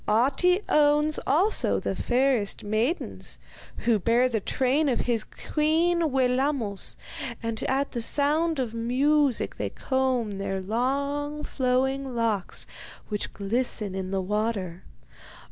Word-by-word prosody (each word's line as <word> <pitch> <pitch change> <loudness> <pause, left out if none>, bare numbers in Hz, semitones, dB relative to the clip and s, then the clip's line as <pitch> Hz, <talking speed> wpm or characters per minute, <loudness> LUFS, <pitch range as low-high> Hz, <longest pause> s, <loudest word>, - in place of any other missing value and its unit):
Ahti 275 - +3
owns 300 +1 +3
also 360 +10 +2
the - - -2
fairest 250 -4 +1
maidens, 220 - -2 0.5
who 230 -3 +3
bear 235 +6 +3
the 225 -3 0
train 270 +8 +1
of 245 - +1
his 230 -3 +1
queen 325 +5 +1
Wellamos, 255 -5 0 0.5
and 230 -1 -3
at 275 +2 0
the 240 - -3
sound 300 +6 +1
of 245 -4 -2
music 265 +4 +1
they - - -2
comb 260 -4 0
their 195 -1 -2
long, 280 +8 -1
flowing 265 0 0
locks, 225 -5 -1 0.4
which 210 -2 -3
glisten 210 0 -2
in 190 -1 -4
the 195 0 -1
water. 200 -3 -2
255 Hz, 120 wpm, -26 LUFS, 220-290 Hz, 0.5 s, Ahti